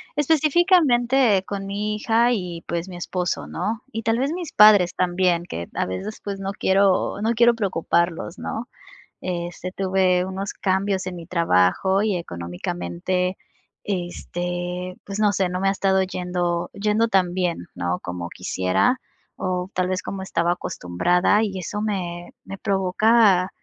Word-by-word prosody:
Específicamente 275 - +3
con 195 -1 -5
mi 210 +2 -2
hija 230 +3 +2
y, 180 -6 -3
pues, 170 +2 -3
mi 180 - -8
esposo, 180 0 -2
¿no?, 225 +1 -3
y 225 - -4
tal 225 +1 +1
vez 275 +3 0
mis 345 -2 -5
padres 205 -4 +6
también, 180 -1 +1
que 85 - -6
a - - 0
veces, 195 - -5
pues, 200 -1 -4
no 195 0 -3
quiero 195 +1 +2
no 225 +2 +1
quiero 235 +1 +5
preocuparlos, 170 -3 -1
¿no? 230 +2 -4 0.5
Este, 175 0 -4
tuve 185 -1 +1
unos 190 +1 -4
cambios 190 0 0
en 180 - -5
mi 170 -1 -8
trabajo 170 - +2
y 210 -4 +1
económicamente, 90 - -3 0.5
este, 175 -1 -4
pues 200 +1 -5
no 210 -1 +4
sé, 190 -2 +1
no 180 0 -3
me 195 - +1
ha - - +4
estado 190 -1 +2
yendo 180 -2 -2
yendo 210 +3 +1
tan 185 -4 +2
bien, 175 - -2
¿no?, 90 +1 -2
como 90 -1 -5
quisiera 95 - 0 0.4
o 180 0 -2
tal 180 0 0
vez 185 +1 -1
como 195 -1 -5
estaba 170 -2 0
acostumbrada 175 - +1
y 195 -3 -3
eso 205 +4 -4
me 175 -5 -3
me 195 - -8
provoca 195 0 +3
185 Hz, 150 wpm, -23 LUFS, 175-210 Hz, 0.5 s, padres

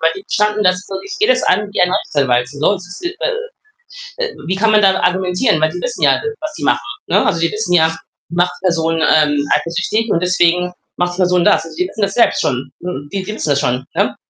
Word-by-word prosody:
die 195 - -10
standen 210 0 +1
da 185 - +5
so 195 +1 -8
ich 195 - -7
gehe 425 - +3
das - - +3
an 205 +2 +1
wie - - +1
ein 180 0 +3
Rechtsanwalt. 125 -8 +1
Sonst 165 +7 -1
ist 180 - -10
äh 470 +6 -3 0.7
äh 460 - -5
wie 185 - -1
kann 220 +2 +2
man 215 - +5
dann 190 -1 +4
argumentieren? 180 +1 +1
Weil 155 - +2
die 180 +2 -6
wissen 250 -1 -4
ja, - - +4
de 450 - -3
was 310 0 -5
die - - -6
machen, - - +1 0.2
ne? - - +2
Also, 165 - +1
die 165 - +1
wissen 215 -4 -2
ja, 160 -1 +3 0.3
macht 175 +1 0
Person, 165 -3 0
ähm, 145 -2 +3
eifersüchtig 195 +8 -1
und 170 - +2
deswegen 180 0 +2 0.2
macht 175 0 -1
Person 180 -1 +2
das. - - +4
Also, 160 -1 -11
sie 180 - 0
wissen 210 +2 -6
das 195 0 0
selbst 240 - +3
schon. 130 -1 -2
Hm, 145 -5 -6
die 195 -1 -3
fi 210 - -5
wissen 150 - -2
das 140 0 +2
schon, 125 -2 -1
ne? - - 0
180 Hz, 230 wpm, -16 LUFS, 165-210 Hz, 0.7 s, da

